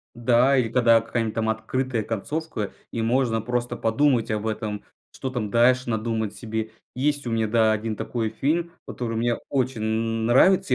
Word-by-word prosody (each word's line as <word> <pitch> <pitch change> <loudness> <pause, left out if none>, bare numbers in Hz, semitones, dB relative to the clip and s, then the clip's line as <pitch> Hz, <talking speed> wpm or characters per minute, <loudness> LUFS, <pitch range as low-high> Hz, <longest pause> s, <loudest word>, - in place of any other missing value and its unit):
да 120 +3 +3
или 120 -3 +1
когда 115 -1 +4
какая-нибудь 115 -1 -2
там 110 -1 -1
открытая 115 +2 -1
концовка, 115 +2 -4 0.2
и 115 - -3
можно 115 -1 +1
просто 120 +1 -2
подумать 115 +1 +2
об 105 0 -1
этом, 105 -1 -3 0.3
что 130 - -5
там 120 -5 -3
дальше 125 +3 +3
надумать 110 -1 -1
себе. 110 -1 -4 0.2
Есть 145 +1 0
у - - -2
меня, 115 -1 +1
да, 110 0 +3
1 110 0 -2
такой 115 0 -2
фильм, 165 +9 -1
который 115 -2 -4
мне 120 +1 +1
очень 130 -3 -1
н 110 +1 -1
нравится. 135 +4 +4
115 Hz, 170 wpm, -24 LUFS, 110-125 Hz, 0.3 s, когда